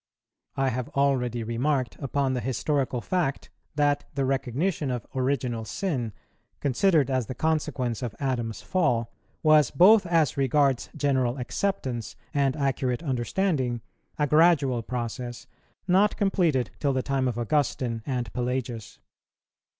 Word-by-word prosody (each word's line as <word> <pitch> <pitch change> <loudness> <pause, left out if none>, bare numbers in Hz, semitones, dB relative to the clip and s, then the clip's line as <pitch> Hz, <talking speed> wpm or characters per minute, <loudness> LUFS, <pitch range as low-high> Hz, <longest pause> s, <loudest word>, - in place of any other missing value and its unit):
_ - - -3
I 135 - +3
have 125 0 -3
already 125 -4 +1
remarked 125 +3 -1
upon 140 -1 0
the 125 - -1
historical 130 0 -1
fact, 170 -5 -2 0.2
that 145 -1 +2
the 135 -1 +1
recognition 135 +4 -1
of 125 -3 -3
Original 130 -3 -1
Sin, 125 - -2 0.5
considered 145 +1 +2
as 130 -4 0
the 130 - -5
consequence 135 -6 -1
of 120 -4 -4
Adam's 120 -5 -2
fall, 120 -11 +1 0.3
was, 155 -4 +5
both 190 +5 +6
as 165 -6 +2
regards 135 -1 +2
general 130 -4 +1
acceptance 125 - -3 0.2
and 140 -2 +2
accurate 135 -1 -1
understanding, 130 - 0 0.4
a 150 - +2
gradual 150 -5 +4
process, 120 0 -5 0.4
not 195 +3 +3
completed 170 -10 +1
till 140 -2 +1
the 130 -1 0
time 135 -1 0
of 120 -2 -2
Augustine 120 -2 0
and 125 -2 -3
Pelagius. 125 -3 -3
130 Hz, 130 wpm, -26 LUFS, 120-150 Hz, 0.5 s, both